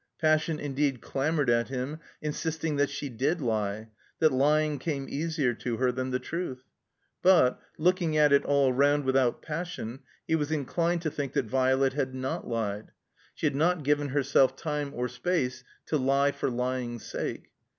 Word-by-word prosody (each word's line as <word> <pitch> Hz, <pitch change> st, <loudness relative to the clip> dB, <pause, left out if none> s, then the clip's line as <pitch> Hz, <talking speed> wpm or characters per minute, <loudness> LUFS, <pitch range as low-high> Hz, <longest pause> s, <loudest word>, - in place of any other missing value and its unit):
Passion 155 Hz, 0 st, +2 dB
indeed 140 Hz, -2 st, -1 dB
clamored 145 Hz, +2 st, -1 dB
at 115 Hz, 0 st, +3 dB
him, 135 Hz, +4 st, -4 dB, 0.2 s
insisting 160 Hz, 0 st, -2 dB
that 145 Hz, 0 st, +2 dB
she 145 Hz, +1 st, -4 dB
did 135 Hz, +8 st, -1 dB
lie, 110 Hz, -3 st, -2 dB, 0.3 s
that 155 Hz, -1 st, +4 dB
lying 150 Hz, +2 st, +2 dB
came 140 Hz, -2 st, -2 dB
easier 150 Hz, -4 st, 0 dB
to 115 Hz, 0 st, -3 dB
her 125 Hz, 0 st, +2 dB
than 130 Hz, +1 st, -3 dB
the 125 Hz, -, 0 dB
truth. 135 Hz, -4 st, -5 dB, 0.6 s
But, 175 Hz, -9 st, +5 dB, 0.2 s
looking 170 Hz, -2 st, +2 dB
at 150 Hz, -1 st, +5 dB
it 140 Hz, -, +5 dB
all 140 Hz, -2 st, +3 dB
roimd 145 Hz, +2 st, +3 dB
without 130 Hz, -2 st, +1 dB
passion, 150 Hz, -7 st, -5 dB, 0.3 s
he -, -, 0 dB
was 150 Hz, -1 st, -1 dB
inclined 165 Hz, +4 st, 0 dB
to 155 Hz, -, -1 dB
think 140 Hz, -2 st, -4 dB
that -, -, +1 dB
Violet 130 Hz, +2 st, +2 dB
had 130 Hz, -2 st, -2 dB
not 130 Hz, 0 st, -3 dB
Ued. 110 Hz, -2 st, -2 dB, 0.5 s
She -, -, -3 dB
had -, -, +2 dB
not 160 Hz, +3 st, +1 dB
given 145 Hz, +1 st, +2 dB
herself 135 Hz, -1 st, +3 dB
time 150 Hz, -1 st, -3 dB
or 125 Hz, +1 st, -1 dB
space 130 Hz, -7 st, -1 dB, 0.2 s
to 155 Hz, -, 0 dB
lie 140 Hz, +2 st, +3 dB
for -, -, -2 dB
lying's 125 Hz, -1 st, -3 dB
sake. -, -, -5 dB
140 Hz, 170 wpm, -28 LUFS, 130-155 Hz, 0.6 s, But